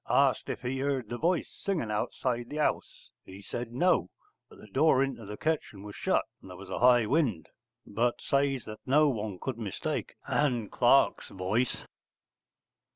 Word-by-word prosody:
Asked - - +3
if - - -4
he 130 +2 -2
heard 135 -5 -1
the 120 - -4
voice 175 +2 +1
singing 165 - -3
outside 120 +3 -2
the 150 - -5
house, 150 - -2
he 95 +1 -11
said 115 +4 -5
'No,' 180 +9 +2 0.4
but - - -16
the - - -13
door 135 -4 +3
into 135 -5 -4
the 105 +1 -6
kitchen 155 -11 -2
was 105 -1 -9
shut, - - +1 0.2
and - - -13
there 90 - -9
was 95 0 -10
a - - -2
high 120 -1 +6
wind: 120 - 0 0.4
but 120 +4 0
says 140 -2 0
that 110 0 -8
no 150 +3 +5
one 105 -6 -3
could 130 -4 -4
mistake 105 -5 -4
Ann 120 -8 +1
Clark's - - +3
voice. 100 +7 -1
120 Hz, 170 wpm, -29 LUFS, 105-140 Hz, 0.4 s, high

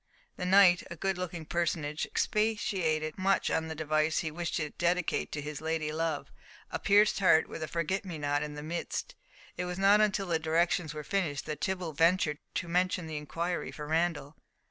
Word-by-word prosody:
The 180 - -3
knight, 185 -2 +6
a 170 - -6
good 190 +2 -1
looking 175 -3 -5
personage, 155 -2 -1
expatiated 190 -8 0
much 195 +1 +2
on 160 - 0
the 160 - -5
device 155 0 +1
he 160 - -3
wished 170 +2 -3
to 150 -2 -2
dedicate 175 0 0
to 145 - -3
his 150 0 -6
lady 160 -1 -1
love, 160 -1 -2 0.4
a - - -2
pierced 205 +1 +4
heart 180 -4 +5
with - - -7
a 155 - -2
forget 170 +4 -1
me 180 -5 -6
not 145 0 0
in 150 0 -4
the 150 - -7
midst, 170 - -4
and - - -12
it - - -2
was 180 0 -4
not 200 +2 +5
until 200 -2 +2
the 170 -3 0
directions 160 0 +1
were 150 - -5
finished 160 -6 -1
that 150 -1 -5
Tibble 185 -4 -2
ventured 160 -1 +2 0.2
to 170 - -2
mention 180 0 +1
the 160 -1 -5
inquiry 170 +4 -3
for 150 - -7
Randall. 160 -2 -1
165 Hz, 195 wpm, -30 LUFS, 155-185 Hz, 0.4 s, knight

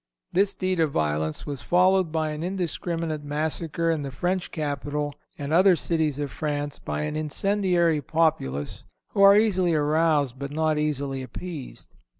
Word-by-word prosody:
This 200 +2 +3
deed 185 -2 -1
of 160 -2 +3
violence 80 - -1
was 140 -4 -4
followed 180 +3 +3
by 155 -1 0
an 150 +1 -5
indiscriminate 170 -3 -3
massacre 160 +2 -1
in 160 -2 -1
the 140 - -4
French 180 +6 -2
capital 145 -1 -3 0.2
and 145 +1 -3
other 185 +2 +6
cities 160 -4 -1
of 145 -2 -3
France 145 +2 -3
by - - -3
an 150 0 -3
incendiary 170 0 +1
populace, 135 - -1 0.3
who 200 - -1
are 200 +1 +8
easily 185 -6 +2
aroused 150 -3 +2
but 140 0 -4
not 155 +1 0
easily 140 -3 -2
appeased. 140 +3 -8
155 Hz, 155 wpm, -25 LUFS, 145-175 Hz, 0.3 s, are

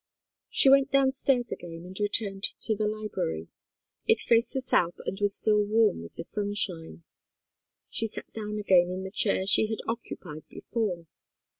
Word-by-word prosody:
She - - +2
went 275 0 +6
downstairs 265 -2 +2
again 165 -1 -7
and 185 +1 -10
returned 205 -1 -1 0.2
to 220 - +3
the 210 +1 0
library. 210 - -3 0.6
It - - +5
faced 230 0 +3
the 265 - 0
south 175 -9 +1
and 195 - -3
was 205 -1 +3
still 210 -1 +3
warm 215 - +3
with 85 - -11
the - - -5
sunshine. 195 -5 -3 0.8
She 225 - -2
sat - - -8
down 210 -1 -4
again 185 -4 +4
in 185 +1 -4
the 190 - -6
chair 200 -2 0
she 205 +2 +3
had 220 0 -2
occupied 180 -9 -5
before. 195 -8 -3
205 Hz, 160 wpm, -28 LUFS, 180-225 Hz, 0.8 s, went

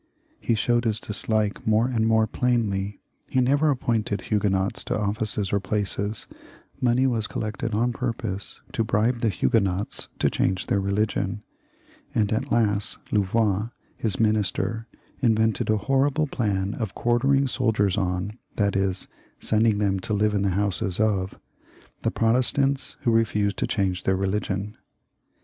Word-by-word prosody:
He 115 - +1
showed 120 +2 +1
his 110 -1 +1
dislike 110 0 -2
more 110 +2 +4
and 115 -3 +1
more 110 0 +4
plainly; 105 -5 0 0.3
he 130 - +1
never 140 +5 +3
appointed 115 -6 0
Huguenots 100 -2 0
to - - -1
offices 105 -1 -1
or 100 - +3
places; 100 +1 -2 0.5
money 125 +1 +3
was 115 -5 0
collected 110 +1 -3
on 120 +3 +1
purpose 115 -5 -4
to 115 - 0
bribe 115 +2 +1
Huguenots 100 -2 0
to - - +2
change 95 0 0
their 100 - +1
religion; 100 +1 -1 0.7
and 105 -1 +2
at 110 - -2
last 105 -3 +1
Louvois, 105 +1 +1 0.3
his 105 -5 -2
minister, 110 0 0 0.3
invented 110 -3 +2
a 110 - +3
horrible 135 +6 +2
plan 100 -7 -1
of 110 -5 -4
quartering 135 +4 +2
soldiers 110 -7 +1
on, 95 +3 -2 0.2
that 100 -2 +1
is, 95 -1 0 0.3
sending 110 -1 +2
them 100 -2 +1
to 105 +3 -2
live 105 +1 +2
in 100 - +1
the 100 - +2
houses 100 -2 -1
of, 100 -3 0 0.6
the - - +1
Pro 115 0 +2
testants 135 +2 +1
who 120 - +2
refused 105 -2 +1
to - - 0
change 95 -4 0
their 95 - +1
religion. 100 +1 -2
110 Hz, 145 wpm, -25 LUFS, 100-115 Hz, 0.7 s, more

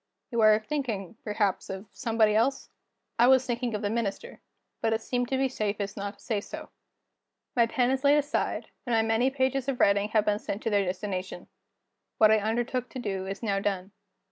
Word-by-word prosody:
"You 235 -2 +1
are 215 -1 +7
thinking, 220 - -4
perhaps, 210 -3 -1
of 190 +2 -6
somebody 225 -4 +2
else?" 230 +6 +1 0.5
I 240 - +7
was 260 0 +5
thinking 240 -2 -2
of 210 - -4
the 205 - 0
Minister; 230 - -3 0.4
but 225 - +2
it 225 - -1
seemed 245 -1 -1
to 265 - +1
be 270 0 +2
safest 205 -5 -3
not 200 0 -5
to - - -19
say 215 -4 0
so. - - -8 0.9
My 235 -2 +4
pen 245 +1 +1
is 265 +1 -1
laid 285 +1 +6
aside, 290 0 -1 0.2
and 240 - +2
my 225 - +3
many 225 +3 +2
pages 265 -1 0
of 260 - -2
writing 200 +1 +3
have 215 -1 +2
been 210 0 +1
sent 205 -1 -5
to 225 - -1
their 200 -1 +3
destination. 185 -1 -4 0.7
What 215 -1 +6
I 220 - +5
undertook 240 +4 -1
to - - -8
do, 195 -5 -3
is 195 +4 -6
now 200 -3 +1
done. 195 -1 -2
220 Hz, 200 wpm, -28 LUFS, 205-245 Hz, 0.9 s, are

